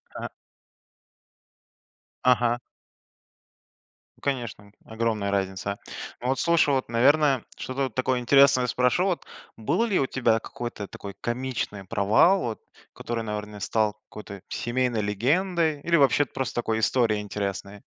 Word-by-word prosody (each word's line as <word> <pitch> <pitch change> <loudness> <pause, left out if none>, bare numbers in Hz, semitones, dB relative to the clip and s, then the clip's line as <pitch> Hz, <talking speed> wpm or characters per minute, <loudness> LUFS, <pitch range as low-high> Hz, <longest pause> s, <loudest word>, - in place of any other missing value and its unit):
ага. - - -5 1.9
Ага. 120 -1 +3 1.6
Ну - - -27
конечно, 120 -7 -3
огромная 110 -3 -1
разница. 100 +1 -2 0.4
Но 125 - -4
вот 130 0 +1
слушай, 170 -3 +3
вот, 130 -1 -1
наверное, 135 +2 +4
что-то 130 +1 -3
вот 130 -5 -3
такое 130 -1 +1
интересное 130 0 +5
спрошу. 125 +9 +2
Вот 185 -3 -1 0.3
был 145 - +1
ли 205 -5 +1
у 135 - +2
тебя 115 -4 +2
какой-то 120 -4 -6
такой 100 -1 -9
комичный 120 -5 -3
провал, 105 - +4
вот 115 -3 -3 0.3
который, 115 -1 -4
наверно, 105 -1 -5
стал 105 +1 +1 0.2
какой-то 100 -2 -9
семейной 120 -1 -1
легендой 155 - +1
или 170 +2 +2
вообще 145 -1 +4
просто 135 -1 -4
такой 110 -2 0
историей 110 -2 +2
интересной? 100 0 -5
120 Hz, 125 wpm, -26 LUFS, 105-135 Hz, 1.9 s, интересное